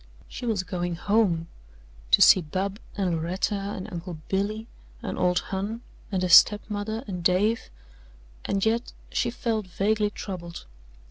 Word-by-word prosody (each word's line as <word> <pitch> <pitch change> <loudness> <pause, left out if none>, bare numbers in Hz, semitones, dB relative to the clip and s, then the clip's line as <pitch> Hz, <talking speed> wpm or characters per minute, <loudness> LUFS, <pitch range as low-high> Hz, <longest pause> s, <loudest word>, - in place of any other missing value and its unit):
She 245 - -6
was 210 -5 0
going 175 -1 -3
home 180 -3 +1 0.6
to - - +7
see 185 - +8
Bub 190 +6 -3 0.2
and 190 -3 +1
Loretta 170 +5 -1
and 200 -1 -4
Uncle 170 -1 -6
Billy 205 +3 -1 0.4
and 190 -4 -3
"old 180 0 +2
Hon" 205 +4 -3 0.3
and 185 -2 0
her - - +2
step 205 +4 +8
mother 215 +2 -3
and 180 -3 -5
Dave, 200 +6 +2 0.7
and 195 0 0
yet 230 +2 0 0.2
she 240 - 0
felt 225 -4 -2
vaguely 210 +3 +1
troubled. 180 -4 -7
195 Hz, 145 wpm, -26 LUFS, 180-215 Hz, 0.7 s, see